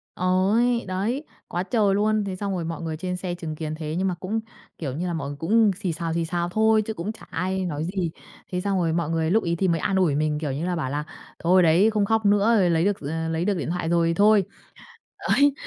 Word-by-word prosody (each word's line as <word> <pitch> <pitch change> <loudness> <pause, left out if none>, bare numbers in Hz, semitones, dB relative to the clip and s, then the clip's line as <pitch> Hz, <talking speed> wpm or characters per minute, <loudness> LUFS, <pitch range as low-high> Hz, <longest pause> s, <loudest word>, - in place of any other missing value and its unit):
Ôi. 200 +7 +2
Đấy, 205 +10 -1 0.2
quá 175 - -2
trời 205 -2 +2
luôn. 215 +1 +2
Thế 190 -2 -3
xong 200 0 -3
rồi 170 -2 -3
mọi 165 0 -4
người 160 -2 -4
trên 180 +2 -3
xe 180 -1 -4
chứng 160 -3 -6
kiến 155 0 -4
thế 155 -1 -4
nhưng 190 +1 +1
mà 180 - -1
cũng, 210 +5 -2 0.4
kiểu 135 -6 -4
như 180 +2 -2
là, 175 - -2
mọi 140 -4 -3
người 145 - -7
cũng 210 +7 +3
xì 185 -3 -2
xào, 165 0 -3
xì 170 0 0
xào 175 +1 -2
thôi 220 +2 +3
chứ 220 +1 -4
cũng 200 +1 -4
chả 220 - -13
ai 185 +2 -2
nói 155 -3 -3
gì. 180 -1 -2 0.4
Thế 180 -1 -1
xong 195 0 0
rồi 165 -2 +1
mọi 170 -2 -1
người 165 0 0
lúc 220 +3 +3
ấy 170 -1 0
thì 190 +3 0
mới 165 -2 +1
an 195 - 0
ủi 180 -7 +3
mình, 150 0 0
kiểu 150 -3 -2
như 145 +5 -3
là, 180 0 -1
bảo 155 -6 -2
là 145 +2 -2 0.4
"Thôi, 180 +2 +4
đấy, 170 +6 +5
không 210 -2 +1
khóc 220 0 +1
nữa. 205 +3 +4
Rồi, 180 -3 +3
lấy 165 +2 +2
được, 205 -1 +1
d - - -15
ờ, 160 +2 -2
lấy 165 +2 -1
được 205 - +2
điện 160 - -3
thoại 175 -2 -2
rồi 170 -1 +3
thì 165 - +1
thôi." 205 +1 +5 0.9
Đấy, 285 0 +5
180 Hz, 270 wpm, -24 LUFS, 165-200 Hz, 0.9 s, đấy